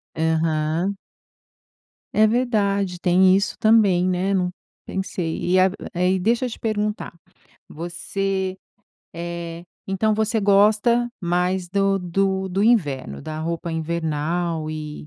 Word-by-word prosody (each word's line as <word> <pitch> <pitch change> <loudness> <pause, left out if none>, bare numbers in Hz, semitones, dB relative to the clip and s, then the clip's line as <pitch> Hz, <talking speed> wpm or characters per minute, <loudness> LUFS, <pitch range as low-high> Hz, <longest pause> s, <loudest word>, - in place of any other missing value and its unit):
Aham. 160 +3 0 1.2
É 215 0 +4
verdade! 200 -6 0
Tem 185 +1 +4
isso 200 - 0
também, 210 -5 +4
né, 185 +2 0
não 180 -2 +1 0.4
pensei. 185 -3 -3
E 185 +1 +3
ago 190 +1 +3 0.5
deixa 235 +5 +1
eu 250 - -2
te - - -9
perguntar, 210 -3 -2 0.6
você 190 +3 -3 0.6
eh, 170 0 -6 0.2
então, 210 +3 +1
você 220 +1 0
gosta 210 +4 +4
mais 180 0 0
do 195 +1 +1
do 190 +1 -1
do 190 +2 -1
inverno, 140 - +1
da 155 0 -6
roupa 170 +1 -3
invernal 160 0 -2
e 150 -1 -7
185 Hz, 115 wpm, -22 LUFS, 170-200 Hz, 1.2 s, É